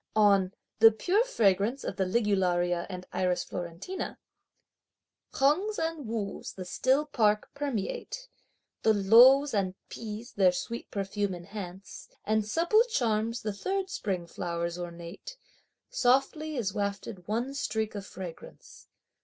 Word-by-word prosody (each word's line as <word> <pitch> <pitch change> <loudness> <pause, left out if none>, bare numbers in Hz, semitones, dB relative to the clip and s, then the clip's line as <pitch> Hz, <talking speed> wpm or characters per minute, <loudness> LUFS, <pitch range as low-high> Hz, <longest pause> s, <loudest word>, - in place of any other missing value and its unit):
On 200 -3 +4 0.3
"the 225 0 +9
pure 370 - +2
fragrance 225 - +1
of - - -4
the 190 - 0
Ligularia 180 -4 +1
and 180 -1 -6
Iris 180 -1 +1
Florentina:" 175 - -5 1.1
Hengs 365 +11 +2
and 320 -5 -2
Wus 215 -3 -4
the 185 - -7
still 260 +10 +2
park 215 -7 +1
permeate; 290 - -4 0.5
The 220 -1 +4
los 245 +8 +7
and 190 -3 0
pis 225 +1 -7
their 185 -3 +4
sweet 235 +6 -5
perfume 200 -1 -2
enhance; 190 +1 -9 0.2
And 215 0 +2
supple 345 - +3
charms 230 - 0
the 210 -1 -2
third 380 - -2
spring 185 -4 -2
flowers 170 0 -3
ornate; 175 - -8 0.5
Softly 300 - +2
is 210 -7 -1
wafted 200 -2 -4
one 235 +6 -1
streak 220 -5 -2
of 205 -2 -5
fragrance! 185 -4 -10
210 Hz, 125 wpm, -29 LUFS, 185-270 Hz, 1.1 s, the